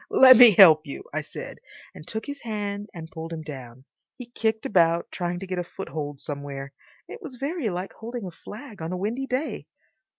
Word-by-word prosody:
"Let 260 -1 +9
me 245 -1 +10
help 160 -5 +8
you!" 140 - -7
I - - -1
said, - - -9 0.3
and 155 - -12
took 220 0 -5
his 285 -1 -7
hand 205 -2 -4
and 160 -2 -9
pulled 165 -2 -7
him 160 -1 -5
down. 130 -4 -10 0.3
He 240 -2 -10
kicked 220 -2 -1
about, 170 -3 +2
trying 175 0 -3
to 195 - -6
get 185 -1 -3
a - - -1
foothold 150 -6 -6
somewhere. 140 -1 -6 0.3
It 470 - -10
was 310 -9 -8
very 280 -1 -2
like 180 +1 -5
holding 235 -1 -7
a 180 - -6
flag 210 - -11
on 160 +2 -4
a 185 - -2
windy 230 +8 -3
day. 255 - -3
190 Hz, 200 wpm, -25 LUFS, 160-235 Hz, 0.3 s, me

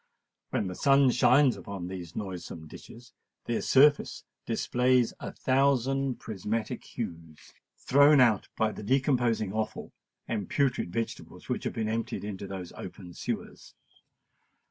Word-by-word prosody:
When - - -1
the 90 - -4
sun 135 +4 +4
shines 130 +2 +4
upon 100 -3 -7
these 90 -3 -7
noisome 90 -5 -6
ditches, 115 +9 -13 0.3
their 120 -1 -1
surface 145 +2 +4 0.2
displays 125 -1 +2
a - - -6
thousand 135 0 +1
prismatic 110 +1 -3
hues, 80 -2 -8 0.2
thrown 145 +2 +5
out 115 -6 +4
by 110 -1 +2
the - - -8
decomposing 120 -4 +1
offal 110 0 -4 0.3
and 105 -5 -3
putrid 130 -10 0
vegetables 115 +3 -5
which - - -2
have - - -2
been 110 -1 -2
emptied 115 -1 -3
into 100 -1 -5
those 95 -3 -7
open 90 -1 -9
sewers. - - -6
115 Hz, 130 wpm, -29 LUFS, 95-130 Hz, 0.3 s, thrown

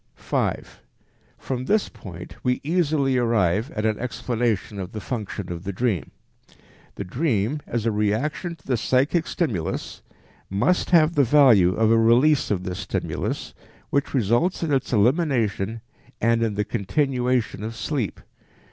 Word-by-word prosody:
5. - - -3 0.6
From 130 -1 -4
this 210 +5 +2
point 90 -6 -10
we 125 0 +1
easily 150 -5 +1
arrive 115 -2 +1
at 110 0 -1
an 110 -1 0
explanation 115 -4 -2
of 95 0 -6
the 110 - -4
function 105 -5 -5
of 85 0 -6
the 100 - -3
dream. 100 - -1 0.9
The - - -4
dream, 120 - -1
as 120 -2 -2
a 115 - +2
reaction 110 - -1
to - - -29
the 125 -3 0
psychic 140 +8 +1
stimulus, 110 - -3 0.5
must 105 - +1
have 165 -2 +5
the 145 - +4
value 120 -9 +5
of 110 0 +3
a 115 - +5
release 125 +6 +4
of 95 -3 -1
this 90 -1 -4
stimulus - - -3 0.4
which 140 0 0
results 120 - +1
in 155 -3 0
its 135 - 0
elimination 115 - +1 0.4
and 115 +1 +2
in 110 -3 0
the 105 0 0
continuation 125 0 0
of 115 +1 -5
sleep. 125 -3 -3
115 Hz, 145 wpm, -24 LUFS, 105-140 Hz, 0.9 s, have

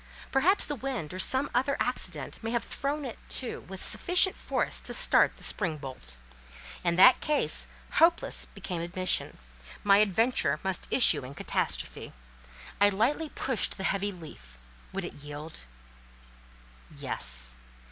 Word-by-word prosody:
Perhaps 325 +10 +3
the 295 - -3
wind 255 - -5
or 185 - -6
some 265 +8 +1
other 270 +3 +1
accident 175 - 0
may 225 - -3
have 235 0 -1
thrown 285 +1 -3
it 245 - -7
to 255 - -3
with 190 0 -8
sufficient 365 +1 +3
force - - -2
to - - -1
start - - +3
the - - -13
spring 170 -7 -1
bolt? 130 - -9 0.7
In 170 -1 +1
that 250 +8 +7
case, 300 -1 0 0.3
hopeless 335 +1 +3
became 175 -3 -6
admission; 180 +1 0 0.5
my 200 0 +5
adventure 210 - +1
must 190 -2 -2
issue 160 - +5
in 130 +2 -9
catastrophe. - - -3 0.7
I 205 0 +6
lightly 255 +11 0
pushed 260 -7 -1
the 190 - -6
heavy 200 +2 0
leaf; 60 - -13 0.3
would - - -4
it - - -7
yield? 145 - -8 1.2
Yes. - - +1
195 Hz, 140 wpm, -28 LUFS, 155-260 Hz, 1.2 s, that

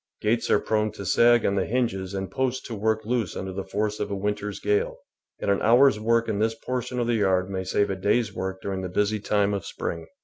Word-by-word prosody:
Gates 115 +2 0
are - - +5
prone 110 -1 0
to 100 - -8
sag 120 +5 +4
on 100 - +2
the 100 -1 0
hinges 100 -6 -1
and 95 -1 -4
posts 130 +2 -1
to 120 - -6
work 110 +1 0
loose 115 -4 -1
under 95 0 -5
the 95 +1 -4
force 105 +2 -2
of - - -2
a 100 - -2
winter's 105 0 -3
gale, 105 0 0 0.4
and - - 0
an 100 - +1
hour's 120 0 +5
work 115 +1 +2
in 105 -3 -1
this 110 +1 +1
portion 125 +2 -4
of 120 - +1
the 120 - +1
yard 95 -2 +1
may 95 -1 -2
save 100 +2 +1
a - - -1
day's 105 +3 +1
work 95 0 -4
during 95 -1 -3
the 95 - -4
busy 105 +3 0
time 105 0 +1
of 100 - -2
spring. 85 -1 -5
105 Hz, 240 wpm, -25 LUFS, 95-115 Hz, 0.4 s, are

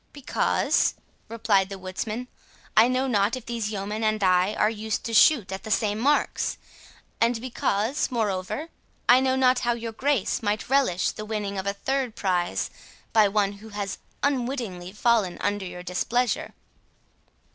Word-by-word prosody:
"Because," 285 -3 +1 0.3
replied 210 -4 +2
the 195 - -6
woodsman, 210 +6 -5 0.5
"I 225 +2 +7
know 255 +1 +1
not 210 -3 +2
if 255 -2 -8
these 230 -3 -3
yeomen 210 +1 -3
and 215 -1 +1
I 185 +2 +3
are 210 - +3
used 220 -1 -3
to 230 - -4
shoot 225 - +5
at 190 - -4
the 220 - -8
same 210 0 +1
marks; 285 +5 +1 0.6
and 230 0 +3
because, 235 +1 -1
moreover, 220 - -2 0.4
I 245 +1 +7
know 260 0 +2
not 255 -1 +4
how 240 0 +1
your 230 -1 -5
Grace 265 -1 0
might 210 0 -2
relish 260 -10 +2
the 215 - -7
winning 210 -2 -3
of 190 - -4
a 200 - +1
third 260 +2 -2
prize 180 -5 -1 0.4
by 215 -2 +6
one 200 0 +1
who 220 - -11
has 205 -2 -4 0.2
unwittingly 240 -10 -2
fallen 210 -3 +1
under 205 -1 -1
your 180 0 -8
displeasure." 230 +7 -1
220 Hz, 155 wpm, -25 LUFS, 200-245 Hz, 0.6 s, I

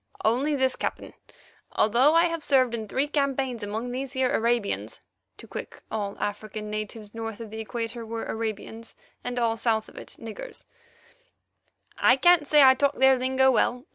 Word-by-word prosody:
"Only 265 +7 +2
this, 260 -1 +1
Captain. - - -4 0.6
Although 250 +8 +4
I 335 +1 +6
have 335 -1 -2
served 260 -4 +3
in 220 -2 -4
three 270 +7 0
campaigns 270 -4 -1
among 220 +4 -4
these 265 +1 -4
here 260 -1 +1
Arabians 235 -2 0 0.4
(to - - -11
Quick, - - -8
all 205 -2 -3
African 210 +1 -4
natives 215 0 -6
north 225 -1 -6
of 225 -2 -8
the 220 - -6
Equator 230 +1 -4
were 225 0 -5
Arabians, 225 +1 -5 0.3
and 245 0 -4
all 230 -2 +1
south 220 -1 0
of - - -17
it, - - -7
niggers), 230 - -8 1.3
I 250 - +6
can't 335 +1 +4
say 295 -1 +6
I 260 -1 +8
talk 280 +1 +1
their 265 0 +5
lingo 265 +1 +3
well. 250 +1 +1
240 Hz, 170 wpm, -26 LUFS, 220-265 Hz, 1.3 s, I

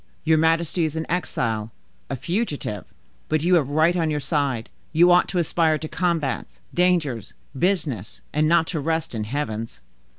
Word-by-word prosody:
Your 160 0 +4
majesty 165 +1 +2
is 155 -1 -1
an 160 0 -2
exile, 115 -11 -1 0.4
a 135 - -2
fugitive, 150 - -3 0.4
but 155 0 +1
you 180 +2 +3
have 155 -6 +3
right 160 +4 +3
on 165 -3 +1
your 150 -1 0
side; 140 -5 -1 0.2
you 175 +2 +5
ought 180 0 +5
to 185 - -3
aspire 165 -2 +2
to 155 - -6
combats, 165 -5 -2
dangers, 170 - +1 0.2
business, 140 - -1
and 155 +1 +2
not 165 0 +4
to 165 - -2
rest 160 +1 -1
in 110 -2 -3
heavens." 115 - -4
155 Hz, 165 wpm, -23 LUFS, 135-170 Hz, 0.4 s, you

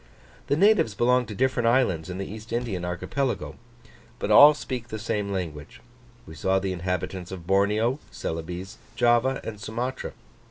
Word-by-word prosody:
The - - +2
natives 175 - +4
belong 125 +3 +2
to 105 - -7
different 130 0 +1
islands 115 -10 +2
in 90 - -5
the 95 - -3
East 110 +3 -9
Indian 115 -7 -2
archipelago, 120 +9 -2 0.6
but - - -2
all 150 +1 +9
speak 125 -5 -5
the 110 - -5
same 105 -2 -2
language: 80 -6 -5 0.5
we 80 - -11
saw 95 +4 +1
the 95 -1 -1
inhabitants 90 0 -3
of 90 -3 -7
Borneo, 105 - +2
Celebes, 90 +5 -6 0.2
Java, 120 +3 +3
and 110 -2 -6
Sumatra. 120 +5 -4
105 Hz, 155 wpm, -26 LUFS, 95-125 Hz, 0.6 s, all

